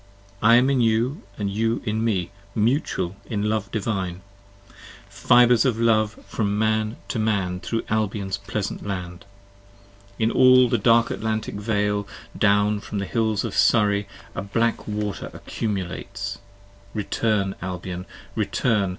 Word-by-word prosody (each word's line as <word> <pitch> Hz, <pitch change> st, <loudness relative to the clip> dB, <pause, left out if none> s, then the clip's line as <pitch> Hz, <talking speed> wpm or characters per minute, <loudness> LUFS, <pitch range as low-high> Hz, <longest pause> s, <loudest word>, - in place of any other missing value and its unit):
I 115 Hz, +2 st, +6 dB
am 125 Hz, +3 st, +4 dB
in 130 Hz, -2 st, +2 dB
you 120 Hz, -, +1 dB, 0.2 s
and 105 Hz, -, -2 dB
you 115 Hz, +4 st, -1 dB
in 110 Hz, 0 st, -1 dB
me, 100 Hz, -6 st, 0 dB, 0.2 s
mutual 110 Hz, -, 0 dB
in 105 Hz, -3 st, -2 dB
love 110 Hz, 0 st, -1 dB
divine: 95 Hz, -4 st, -2 dB, 0.8 s
Fibres 120 Hz, -1 st, +4 dB
of 125 Hz, -4 st, +1 dB
love 110 Hz, -2 st, +3 dB
from 105 Hz, -2 st, -1 dB
man 110 Hz, +1 st, +1 dB
to 115 Hz, -, -2 dB
man 100 Hz, -5 st, 0 dB
thro' 115 Hz, +4 st, -2 dB
Albion's 100 Hz, -2 st, -1 dB
pleasant 100 Hz, +1 st, -4 dB
land. 90 Hz, -3 st, -5 dB, 0.9 s
In 110 Hz, 0 st, +1 dB
all 130 Hz, -1 st, +6 dB
the 120 Hz, -, +1 dB
dark 115 Hz, +2 st, +4 dB
Atlantic 110 Hz, 0 st, -2 dB
vale 105 Hz, -1 st, -1 dB, 0.3 s
down 105 Hz, +1 st, +3 dB
from 105 Hz, -, -6 dB
the 100 Hz, -, -1 dB
hills 110 Hz, +1 st, 0 dB
of -, -, -4 dB
Surrey 105 Hz, -2 st, +3 dB, 0.3 s
10 -, -, -11 dB
A -, -, -1 dB
black 115 Hz, +3 st, 0 dB
water 105 Hz, -1 st, -3 dB
accumulates, 95 Hz, -5 st, -4 dB, 0.6 s
return 105 Hz, -1 st, 0 dB
Albion! 90 Hz, 0 st, -5 dB, 0.3 s
return! 105 Hz, -1 st, +1 dB
105 Hz, 135 wpm, -24 LUFS, 100-115 Hz, 0.9 s, I